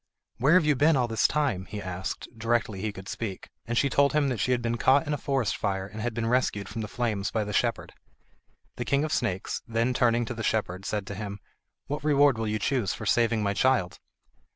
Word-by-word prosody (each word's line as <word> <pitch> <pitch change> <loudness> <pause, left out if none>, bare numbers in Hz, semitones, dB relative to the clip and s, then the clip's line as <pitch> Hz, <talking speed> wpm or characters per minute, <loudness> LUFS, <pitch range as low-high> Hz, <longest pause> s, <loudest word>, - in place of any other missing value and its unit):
"Where 140 +8 +5
have 185 -4 +5
you 150 -1 +3
been 150 +4 +4
all 125 -2 +2
this 115 -2 +2
time?" 135 -11 0
he 105 - -6
asked, 95 -1 -5
directly 115 -3 -1
he 110 - -2
could 95 -1 -10
speak, 110 -5 -5 0.2
and 120 0 -1
she 140 - +4
told 140 +1 +3
him 150 -2 +2
that 125 -4 -2
she 125 - +1
had 125 - +2
been 120 0 -1
caught 135 +6 +4
in 150 - -2
a - - 0
forest 135 -6 0
fire, 95 -1 -2
and 105 +2 -8
had 120 0 -2
been 115 -1 -1
rescued 115 -4 0
from 115 - -5
the 105 - -4
flames 105 -2 -1
by 110 - -1
the 105 0 -5
shepherd. - - 0 0.8
The 120 - -3
King 140 +3 +2
of 155 - -2
the - - +2
Snakes, 95 -6 -2
then 115 +2 +1
turning 120 -1 +2
to 120 - -4
the 115 - -6
shepherd, 100 -4 -1
said 105 -2 -2
to 100 - -6
him: 100 0 -6 0.5
"What 145 +1 -4
reward 145 -4 +4
will 110 - -1
you 105 0 0
choose 110 -2 0
for 110 - -7
saving 115 0 +2
my 100 0 +1
child?" 110 -3 +1
115 Hz, 240 wpm, -27 LUFS, 105-130 Hz, 0.8 s, Where